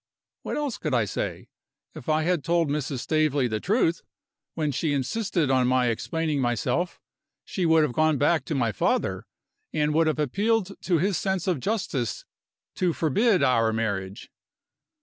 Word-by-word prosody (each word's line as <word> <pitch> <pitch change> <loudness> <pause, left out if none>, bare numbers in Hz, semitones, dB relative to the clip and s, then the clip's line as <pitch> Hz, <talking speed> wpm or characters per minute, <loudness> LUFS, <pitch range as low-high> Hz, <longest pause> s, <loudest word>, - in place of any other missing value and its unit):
What - - -4
else 290 -5 -2
could 150 -5 -1
I 115 -3 +2
say? - - -4 0.4
If 120 - -8
I 155 0 +2
had 175 -3 0
told 170 -2 +1
Mrs. 140 -3 -2
Staveley 155 -4 +1
the 110 -2 -2
truth, 185 - +1 0.5
when 155 -3 0
she 145 +2 -1
insisted 155 - 0
on 130 -1 +3
my 125 -1 +3
explaining 155 +5 -1
myself, 125 +9 -1 0.5
she 180 -3 -1
would 160 -1 +5
have 150 - -1
gone 155 0 +2
back 145 +1 +2
to 155 - -3
my 120 -4 +1
father, - - -1 0.4
and 150 -1 0
would 160 +1 +3
have 155 - +1
appealed 195 - 0
to 175 -3 +3
his 190 +2 +1
sense 190 -2 -1
of 180 -7 0
justice 145 - -2 0.5
to 180 -2 +1
forbid 180 - +2
our 115 -4 +3
marriage. 100 -3 -3
155 Hz, 165 wpm, -26 LUFS, 130-175 Hz, 0.5 s, would